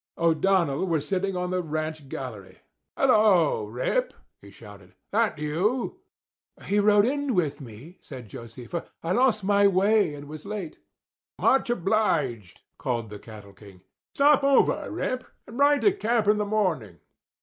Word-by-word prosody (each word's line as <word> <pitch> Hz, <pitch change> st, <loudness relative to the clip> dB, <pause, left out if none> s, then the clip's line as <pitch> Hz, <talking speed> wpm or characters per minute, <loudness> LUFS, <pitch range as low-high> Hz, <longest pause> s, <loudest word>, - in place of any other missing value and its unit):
O'Donnell 170 Hz, -1 st, +1 dB
was 155 Hz, -4 st, -1 dB
sitting 195 Hz, 0 st, -1 dB
on 180 Hz, 0 st, -2 dB
the 185 Hz, 0 st, 0 dB
ranch 155 Hz, -2 st, -5 dB
gallery. 105 Hz, -10 st, -8 dB, 0.4 s
"Hello, 210 Hz, -, +3 dB
Rip!" 130 Hz, -, -2 dB, 0.3 s
he -, -, -14 dB
shouted—"that 220 Hz, -5 st, -4 dB
you?" 195 Hz, -, -1 dB, 0.7 s
"He 205 Hz, -, +1 dB
rode 205 Hz, 0 st, +4 dB
in 280 Hz, -1 st, -1 dB
with 150 Hz, -5 st, -1 dB
me," 130 Hz, -, -12 dB
said 125 Hz, -5 st, -10 dB
Josefa. 115 Hz, -, -8 dB, 0.2 s
"I 165 Hz, -, -2 dB
lost 230 Hz, -1 st, +2 dB
my 200 Hz, +1 st, +4 dB
way 200 Hz, -3 st, +2 dB
and 145 Hz, 0 st, -10 dB
was 155 Hz, 0 st, -9 dB
late." 200 Hz, -5 st, -6 dB, 0.6 s
"Much 265 Hz, -2 st, +2 dB
obliged," 165 Hz, -, -1 dB, 0.2 s
called 115 Hz, -3 st, -3 dB
the 105 Hz, -, -8 dB
cattle 105 Hz, -2 st, -13 dB
king. 100 Hz, -3 st, -16 dB, 0.3 s
"Stop 285 Hz, 0 st, +4 dB
over, 275 Hz, -1 st, +2 dB
Rip, 255 Hz, 0 st, -3 dB, 0.2 s
and 235 Hz, +4 st, -10 dB
ride 285 Hz, 0 st, +4 dB
to 410 Hz, -, +5 dB
camp 235 Hz, -, 0 dB
in 210 Hz, 0 st, +3 dB
the 210 Hz, -, 0 dB
morning." 175 Hz, -, -1 dB
180 Hz, 145 wpm, -25 LUFS, 135-215 Hz, 0.7 s, to